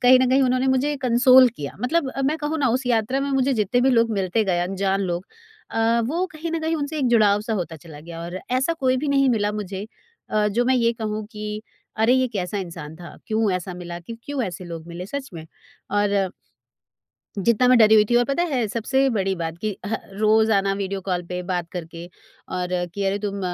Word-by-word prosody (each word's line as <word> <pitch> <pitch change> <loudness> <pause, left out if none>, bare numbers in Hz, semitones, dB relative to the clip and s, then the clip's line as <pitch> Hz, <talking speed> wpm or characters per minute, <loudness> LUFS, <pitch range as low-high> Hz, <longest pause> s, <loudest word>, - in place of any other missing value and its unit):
कहीं 255 +1 +7
न 255 - +2
कहीं 270 +1 +4
उन्होंने 255 +1 +2
मुझे 275 +3 +1
कंसोल 255 +1 +6
किया। 140 -1 -6
मतलब 295 +3 +1
अ, 275 - -4
मैं 295 +4 +1
कहूँ 305 +1 -2
ना 270 -4 +2
उस 255 +2 -1
यात्रा 240 +2 +1
में 280 0 -2
मुझे 270 0 +2
जितने 220 +3 +1
भी 265 - +4
लोग 230 -2 +3
मिलते 195 +2 0
गए 185 -3 +1
अनजान 195 +2 0
लोग 180 0 -3 0.5
अ, 225 +1 +2
वो 340 +7 0
कहीं 320 +2 -5
ना 330 - 0
कहीं 320 +1 0
उनसे 300 +1 -3
एक 260 - +1
जुड़ाव 210 -3 +4
सा 220 +2 -4
होता 170 -4 -3
चला 155 -1 -12
गया। 165 +1 -9
और 175 +2 -5
ऐसा 265 +6 +2
कोई 260 -1 +2
भी 295 - -2
नहीं 275 -1 +3
मिला 210 -3 +1
मुझे 205 -1 -5 0.4
अ, 210 -1 +2
जो 235 +4 +1
मैं 260 +1 +3
ये 235 -1 +2
कहूँ 215 -1 -3
कि 210 -1 -7 0.6
अरे 230 +3 +5
ये 260 0 +3
कैसा 200 -3 -3
इंसान 165 -4 -7
था? 170 0 -11
क्यों 220 -1 +1
ऐसा 180 0 -3
मिला 175 -1 -7
क्यों 230 +7 -9
क्यों 285 -3 -2
ऐसे 180 -2 -6
लोग 165 -1 -8
मिले? 175 +2 -7
सच 280 +3 -5
में 160 -1 -7 0.5
और 200 -2 +1 1.1
जितना 235 +5 +3
मैं 255 - +6
डरी 220 -1 +7
हुई 210 -1 +6
थी 240 - -1
और 245 - +4
पता 275 +6 0
है 265 -10 0
सबसे 265 +4 +1
बड़ी 195 -3 0
बात 165 0 -4
कि 215 +4 -2
अ, - - -4 0.2
रोज़ 220 +2 +3
आना 195 -1 +2
वीडियो 195 0 -3
कॉल 180 -2 -2
पे 180 +1 -4
बात 175 -2 -1
करके, 170 -1 -7 0.4
और 180 -1 -3 0.3
कि 200 -1 -2
अरे 195 +1 0
तुम 200 -1 -4
215 Hz, 225 wpm, -23 LUFS, 185-255 Hz, 1.1 s, कहीं